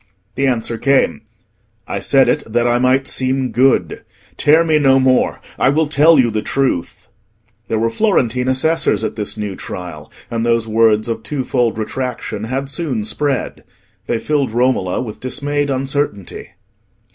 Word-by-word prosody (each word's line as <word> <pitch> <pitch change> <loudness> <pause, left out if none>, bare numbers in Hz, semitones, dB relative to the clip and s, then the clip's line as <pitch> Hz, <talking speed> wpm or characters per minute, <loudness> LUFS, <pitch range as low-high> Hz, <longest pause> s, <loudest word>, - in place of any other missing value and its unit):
The 135 +3 0
answer 115 -2 -1
came: 140 -1 +2 0.7
"I - - -3
said - - +3
it - - +1
that 120 +1 +1
I 120 0 +2
might 130 +2 +2
seem 130 -1 -1
good; 130 +4 +1 0.3
tear 155 +3 +4
me 155 -2 +2
no 135 -2 +4
more, 130 -1 +2 0.2
I 130 - +4
will 155 +3 +2
tell 155 +2 +4
you 120 -3 +3
the 110 0 -1
truth." 130 -11 -2 0.6
There 110 - -1
were 115 +1 0
Florentine 125 - +1
assessors 130 0 +1
at - - -3
this 105 0 -4
new 105 -2 -4
trial, 90 -6 -8 0.2
and 115 -1 -1
those 115 -1 +1
words 110 0 +3
of 115 - -3
twofold 125 -5 -1
retraction 110 -2 -4
had 135 +4 -3
soon 140 -6 -3
spread. 135 +5 -2 0.4
They 120 - 0
filled 145 +2 0
Romola 120 -7 +1
with 110 -4 -8
dismayed 145 +2 -2
uncertainty. 135 -7 -3
130 Hz, 155 wpm, -17 LUFS, 115-140 Hz, 0.7 s, tear